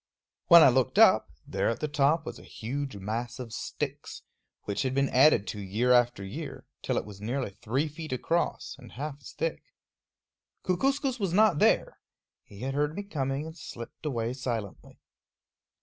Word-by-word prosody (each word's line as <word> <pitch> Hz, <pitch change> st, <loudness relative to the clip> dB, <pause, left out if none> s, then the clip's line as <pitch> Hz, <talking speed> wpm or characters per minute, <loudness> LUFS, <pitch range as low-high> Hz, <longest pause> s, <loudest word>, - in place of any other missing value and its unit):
When 170 Hz, -2 st, +10 dB
I -, -, +8 dB
looked 130 Hz, -2 st, +1 dB
up, -, -, +6 dB, 0.2 s
there -, -, 0 dB
at 115 Hz, -, -2 dB
the 155 Hz, -, -1 dB
top 150 Hz, +2 st, +2 dB
was -, -, -7 dB
a -, -, -13 dB
huge 135 Hz, +2 st, -5 dB
mass 115 Hz, +5 st, -4 dB
of 120 Hz, -4 st, -7 dB
sticks, -, -, -5 dB, 0.4 s
which 100 Hz, -, -2 dB
had 130 Hz, -1 st, -1 dB
been 140 Hz, 0 st, +2 dB
added 130 Hz, -5 st, +5 dB
to 105 Hz, -, -5 dB
year 105 Hz, +6 st, 0 dB
after 120 Hz, -4 st, +3 dB
year 95 Hz, -, -7 dB, 0.2 s
till -, -, -1 dB
it -, -, -1 dB
was 100 Hz, -1 st, -11 dB
nearly 125 Hz, +1 st, -2 dB
three 115 Hz, +8 st, -2 dB
feet 155 Hz, 0 st, -8 dB
across, 165 Hz, +7 st, -1 dB
and 125 Hz, -, -13 dB
half 145 Hz, +2 st, -5 dB
as -, -, -11 dB
thick. -, -, -2 dB, 1.0 s
Kookooskoos 265 Hz, -, 0 dB
was 195 Hz, -5 st, -1 dB
not 205 Hz, -5 st, +4 dB
there. -, -, +2 dB, 0.4 s
He 100 Hz, -, -14 dB
had 135 Hz, +1 st, -2 dB
heard 150 Hz, +2 st, 0 dB
me 205 Hz, -, -4 dB
coming 140 Hz, -6 st, -2 dB
and 160 Hz, 0 st, -8 dB
slipped 120 Hz, -8 st, -10 dB
away 120 Hz, -5 st, -2 dB
silently. 120 Hz, -6 st, -5 dB
135 Hz, 175 wpm, -28 LUFS, 115-155 Hz, 1.0 s, When